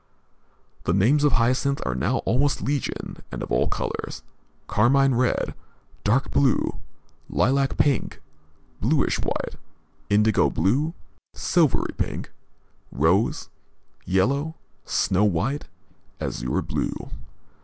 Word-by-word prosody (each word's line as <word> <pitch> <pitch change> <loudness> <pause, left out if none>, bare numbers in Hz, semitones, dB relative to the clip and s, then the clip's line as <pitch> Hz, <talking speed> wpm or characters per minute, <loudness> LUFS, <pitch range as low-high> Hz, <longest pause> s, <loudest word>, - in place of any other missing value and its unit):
The 85 - +2
names 130 +10 +4
of 145 - +4
hyacinths 130 +4 +2
are 65 - -1
now 65 - 0
almost 135 +4 +1
legion, 140 0 -3
and - - -4
of - - -7
all - - +2
colors, - - -4 0.4
carmine 135 +5 +3
red, 125 +1 +1 0.5
dark 130 +6 +1
blue, 135 -3 +2 0.5
lilac 135 +3 +1
pink, 140 -6 +1 0.6
bluish 135 +7 +1
white, - - -3 0.5
indigo 105 +1 +4
blue, 140 - +1 0.4
silvery 165 -7 +2
pink, - - -3 0.6
rose, 85 +10 +1 0.5
yellow, 140 - +1 0.3
snow 95 +2 +1
white, 105 - 0 0.5
azure 60 +1 -2
blue. - - -3
125 Hz, 100 wpm, -24 LUFS, 100-140 Hz, 0.6 s, names